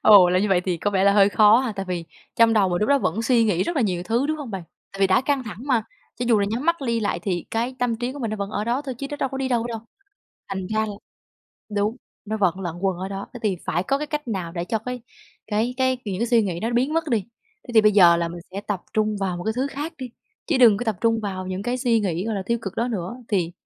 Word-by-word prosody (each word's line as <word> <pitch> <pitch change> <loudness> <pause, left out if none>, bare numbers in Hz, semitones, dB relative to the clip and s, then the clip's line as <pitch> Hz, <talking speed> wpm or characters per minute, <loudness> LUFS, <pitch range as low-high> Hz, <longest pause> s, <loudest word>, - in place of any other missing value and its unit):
Ồ, 195 -4 +8
là 180 +1 +3
như 205 +2 +1
vậy 180 -2 +3
thì 180 -1 -1
có 205 +5 -1
vẻ 195 -1 +2
là 200 - +6
hơi 200 -1 +6
khó 215 +2 +6
ha, 255 -3 -1
tại 195 - -3
vì 175 -2 -2 0.3
trong 230 -1 +5
đầu 205 -4 +3
mà 175 - 0
lúc 210 - +1
đó 280 0 +5
vẫn 225 - -1
suy 230 0 +3
nghĩ 185 -5 +2
rất 345 - -2
là 270 - +3
nhiều 180 -5 -1
thứ, 230 +8 0
đúng 310 +1 -1
hông 290 -6 -7
bạn? 195 -4 -4 0.3
Tại 195 - -8
vì 195 - +6
đã 190 +5 +4
căng 275 -1 0
thẳng 205 -5 -7
mà, 250 -5 +2 0.3
cho 245 - -2
dù 225 -3 +5
là 200 - +1
nhắm 235 +6 -2
mắt 335 - +4
đi 230 -1 +1
lại 205 - -1
thì 180 -5 -2
cái 235 +3 -1
tâm 240 -2 0
trí 245 +2 -3
của 285 - -8
mình 230 -5 -2
nó 215 - -3
vẫn 200 -1 -4
ở 210 0 -2
đó 240 +5 0
thôi 265 -3 -5
chứ 275 - -4
nó 290 - -4
đâu 270 - -1
có 270 0 -5
đi 265 -1 -1
đâu 240 -2 +1
đâu. 230 -2 -4 0.7
Thành 190 -1 -4
ra 215 +2 0
là 210 - -5 0.8
đúng, 210 +3 0 0.3
nó 215 +1 -3
vẫn 190 -3 +1
lẩn 175 -3 -4
quần 190 -2 0
ở 190 - -4
đó, 195 0 -5
thế 245 - -7
thì 200 -4 +1
phải 175 - 0
có 275 +8 0
cái 300 - -3
cách 295 -4 -4
nào 185 -6 -3
để 170 -1 -3
cho 220 +5 -1
cái 250 +3 -5 0.5
cái 225 +4 0
cái 260 -1 +1
những 195 -4 -3
cái 235 - +1
suy 235 -1 +4
nghĩ 180 -4 -3
đó 225 - -1
nó 240 - -3
biến 260 +5 +2
mất 330 0 +1
đi. 230 - +3 0.5
Thế - - -6
thì 220 - +8
bây 215 0 +4
giờ 175 -4 +7
là 170 0 -1
mình 170 +1 -8
sẽ 195 - -4
tập 205 -3 -4
trung 215 -1 +1
vào 185 -2 -1
một 175 - -6
cái 220 - 0
thứ 260 - +1
khác 295 +4 -4
đi, 255 -2 -6 0.4
chứ 300 -6 +1
đừng 230 -5 +7
có 245 - -3
tập 220 -4 -1
trung 230 -1 +2
vào 185 -2 -4
những 185 +1 -4
cái 245 +2 -1
suy 235 -3 +2
nghĩ, 180 -3 -1
gọi 225 - -1
là, 195 - -2
tiêu 235 0 +1
cực 195 - -5
đó 235 +2 0
nữa, 200 -1 -4
thì 180 -5 0
215 Hz, 310 wpm, -23 LUFS, 190-245 Hz, 0.8 s, Ồ